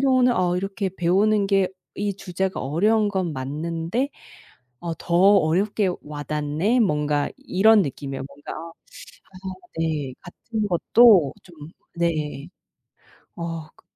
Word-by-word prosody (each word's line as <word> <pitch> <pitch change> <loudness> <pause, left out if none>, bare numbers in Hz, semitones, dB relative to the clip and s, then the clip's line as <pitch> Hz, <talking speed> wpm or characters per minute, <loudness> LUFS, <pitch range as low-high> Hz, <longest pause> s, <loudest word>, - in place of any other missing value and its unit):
경우는 255 -2 +4
'어 180 -1 +1
이렇게 195 0 -2
배우는 200 +4 +2
게 195 -2 +2 0.3
이 205 -1 -1
주제가 190 0 -3
어려운 210 +10 +2
건 185 -5 -1
맞는데 165 - -3 0.7
어 170 -1 -4
더 170 - -4
어렵게 195 +1 +3
와 150 0 -6
닿네.' 150 +10 0
뭔가 150 -7 +1
이런 220 -5 +4
느낌이에요. 135 -2 -5
뭔가 140 +1 -10
어 165 - -9 0.8
그래서 190 +6 -21 0.2
네 145 -5 -3
같은 215 +4 -5
것도 190 - +5
좀 155 -4 -12 0.3
네 155 -2 -1 0.9
어 165 -2 -5
그 - - -24
175 Hz, 230 characters per minute, -23 LUFS, 150-205 Hz, 0.9 s, 것도